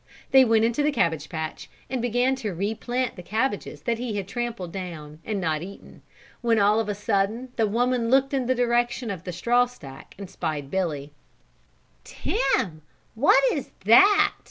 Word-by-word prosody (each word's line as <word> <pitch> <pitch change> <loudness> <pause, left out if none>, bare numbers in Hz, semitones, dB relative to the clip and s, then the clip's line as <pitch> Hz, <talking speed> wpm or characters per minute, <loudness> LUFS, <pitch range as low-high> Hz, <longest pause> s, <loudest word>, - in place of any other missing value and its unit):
They 265 0 +8
went 225 -1 +3
to 290 - 0
the 300 +1 +2
cabbage 160 - 0
patch 160 -2 -5 0.2
and 260 -2 -3
began 245 +2 +1
to 210 -8 -4
replant 225 +6 -2
the 180 - -9
cabbages 205 - -2
that 230 +4 -1
he 240 -3 -3
had 195 -2 -3
trampled 235 -6 -4
down 160 -5 -7
and 215 -2 -3
not 160 -4 -1
eaten, 195 +3 -11 0.4
when 230 -1 +2
all 210 +1 +4
of 220 -2 -2
a 205 - -1
sudden 205 +4 -1
the 225 -2 +2
woman 240 +2 0
looked 270 +2 +3
in 260 -3 0
the 255 - +2
direction 240 -1 0
of 185 -3 -7
the 180 - -4
straw 240 +8 +2
stack 140 - -13
and 200 0 -7
spied 155 -6 -4
Billy. 150 -6 -2 0.9
"Begorry, - - -3
Tim, 175 -14 0 0.3
what 270 +3 +4
is 285 - -4 0.2
that? 390 - +6
220 Hz, 180 wpm, -25 LUFS, 180-245 Hz, 0.9 s, They